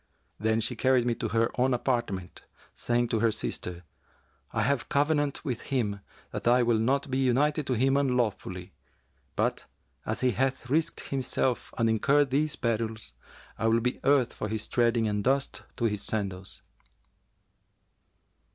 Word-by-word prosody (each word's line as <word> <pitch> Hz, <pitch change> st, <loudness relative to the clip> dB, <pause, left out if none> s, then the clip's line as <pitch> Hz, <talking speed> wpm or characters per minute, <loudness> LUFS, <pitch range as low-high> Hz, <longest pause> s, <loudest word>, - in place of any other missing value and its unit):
Then 110 Hz, +1 st, +1 dB
she 115 Hz, -, -1 dB
carried 130 Hz, -2 st, +3 dB
me 120 Hz, -, +2 dB
to 115 Hz, -, -3 dB
her 115 Hz, +1 st, +1 dB
own 130 Hz, 0 st, +3 dB
apartment, 120 Hz, -8 st, -2 dB, 0.3 s
saying 120 Hz, 0 st, 0 dB
to 110 Hz, -, +1 dB
her 115 Hz, +1 st, +3 dB
sister, 90 Hz, -4 st, -4 dB, 0.7 s
'I -, -, 0 dB
have 140 Hz, -1 st, 0 dB
covenanted 145 Hz, 0 st, +1 dB
with 125 Hz, -5 st, -2 dB
him 105 Hz, -7 st, 0 dB, 0.3 s
that -, -, -4 dB
I 125 Hz, +1 st, +5 dB
will 115 Hz, -2 st, +2 dB
not 135 Hz, +4 st, +1 dB
be 130 Hz, -, +1 dB
united 145 Hz, +4 st, +2 dB
to 130 Hz, -, +1 dB
him 135 Hz, +3 st, +2 dB
unlawfully; 120 Hz, -9 st, -1 dB, 0.6 s
but, -, -, 0 dB, 0.4 s
as -, -, -3 dB
he 130 Hz, -1 st, +3 dB
hath 130 Hz, +1 st, -1 dB
risked 160 Hz, +2 st, 0 dB
himself 130 Hz, -2 st, -1 dB
and 115 Hz, -, +2 dB
incurred 140 Hz, +5 st, +3 dB
these 150 Hz, +2 st, +1 dB
perils, 110 Hz, -, -2 dB, 0.5 s
I 115 Hz, -, +1 dB
will 115 Hz, +1 st, +4 dB
be 125 Hz, +2 st, -1 dB
earth 135 Hz, -4 st, +3 dB
for 105 Hz, -, -4 dB
his 110 Hz, 0 st, -2 dB
treading 115 Hz, -2 st, +2 dB
and 105 Hz, -1 st, -1 dB
dust 135 Hz, +3 st, 0 dB, 0.2 s
to 120 Hz, -, 0 dB
his 105 Hz, -3 st, 0 dB
sandals!'" 95 Hz, -4 st, -4 dB
120 Hz, 155 wpm, -28 LUFS, 110-135 Hz, 0.7 s, I